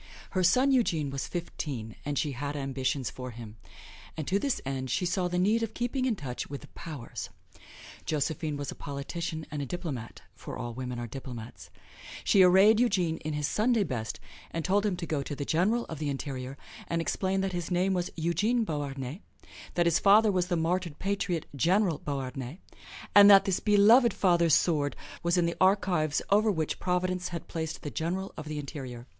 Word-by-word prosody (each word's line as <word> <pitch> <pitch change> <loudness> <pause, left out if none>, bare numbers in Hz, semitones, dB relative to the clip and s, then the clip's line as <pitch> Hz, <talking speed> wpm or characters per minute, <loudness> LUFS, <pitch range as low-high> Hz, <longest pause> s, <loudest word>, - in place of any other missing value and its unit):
Her 185 - +1
son 250 +10 +4
Eugene 165 - +1
was 135 0 -3
fifteen, 135 - -5
and 145 -1 -3
she 150 - 0
had 140 +3 -4
ambitions 135 -1 -2
for 125 0 -7
him; 115 -2 -10 0.6
and 155 - -4
to 195 - +2
this 275 +3 0
end 130 -1 -3
she 180 - 0
saw 180 +1 0
the 180 0 -2
need 210 +6 +3
of 225 -1 -3
keeping 245 +2 -1
in 245 -4 +1
touch 135 -9 -5
with 140 0 -6
the - - -14
Powers. 150 -8 -7 0.8
Josephine 155 0 -1
was 145 -2 -4
a - - -6
politician 155 +3 -5
and 150 -1 -3
a - - -2
diplomat, 145 -8 -5
for - - -8
all 120 -2 -5
women 125 0 -5
are 120 - -4
diplomats. 115 -7 -8 0.5
She 195 - +5
arrayed 190 +4 +7
Eugene 185 -9 +2
in 155 -1 -4
his 150 -1 -1
Sunday 225 0 +2
best 115 - -4 0.3
and 165 -1 -4
told 200 +2 +2
him 195 - 0
to 170 - -4
go 155 -3 -1
to 145 +1 -5
the 140 - -4
General 210 +11 +1
of 160 - -7
the 150 -2 -1
Interior 135 -1 -5 0.3
and 170 - -1
explain 190 +3 0
that 190 -1 -2
his 175 -2 -3
name 185 +2 +2
was 180 -1 -1
Eugene 190 +9 +1
Beauharnais, 145 - -4 0.5
that 175 - +3
his 170 -2 +3
father 210 +2 +6
was 180 -2 +1
the 175 - 0
martyred 170 -1 -1
patriot, 185 -4 -1
General 175 - +2
Beauharnais, 135 0 -4 0.6
and 205 0 +9
that 195 -1 +8
this 190 -2 +1
beloved 215 +3 +5
father's 170 -4 +4
sword 145 -4 +1 0.3
was 170 +1 +1
in 175 - +3
the 170 - -2
archives 185 -6 +2
over 215 +2 +5
which 160 -6 -1
Providence 180 0 0
had 170 -1 -6
placed 160 -2 -4
the 145 - -4
General 185 +4 -3
of 155 - -7
the 155 0 -4
Interior. 130 -5 -6
165 Hz, 190 wpm, -29 LUFS, 140-190 Hz, 0.8 s, and